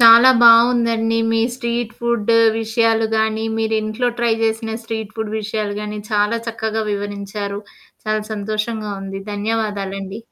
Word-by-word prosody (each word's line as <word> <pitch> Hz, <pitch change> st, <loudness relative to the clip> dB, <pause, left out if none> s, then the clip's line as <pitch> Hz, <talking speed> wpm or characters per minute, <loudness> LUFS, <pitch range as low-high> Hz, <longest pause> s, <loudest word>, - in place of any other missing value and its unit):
చాలా 235 Hz, +2 st, +9 dB
బావుందండి. 230 Hz, -1 st, +5 dB
మీ 225 Hz, 0 st, +2 dB
street 235 Hz, -2 st, -3 dB
food 235 Hz, -2 st, 0 dB, 0.3 s
విషయాలు 225 Hz, 0 st, +1 dB
గానీ, 220 Hz, 0 st, 0 dB
మీరు 220 Hz, 0 st, 0 dB
ఇంట్లో 215 Hz, +3 st, -1 dB
ట్రై 235 Hz, -1 st, +2 dB
చేసిన 225 Hz, 0 st, -1 dB
స్ట్రీట్ 220 Hz, -2 st, -5 dB
ఫుడ్ 220 Hz, -1 st, -4 dB
విషయాలు 210 Hz, -1 st, -3 dB
గాని, 210 Hz, 0 st, -5 dB
చాలా 210 Hz, +2 st, +1 dB
చక్కగా 220 Hz, -1 st, -2 dB
వివరించారు. 200 Hz, 0 st, -4 dB, 0.5 s
చాలా 215 Hz, 0 st, 0 dB
సంతోషంగా 215 Hz, +1 st, -3 dB
ఉంది. 195 Hz, 0 st, -6 dB
ధన్యవాదాలండి. 205 Hz, -2 st, -3 dB
220 Hz, 130 wpm, -19 LUFS, 210-230 Hz, 0.5 s, చాలా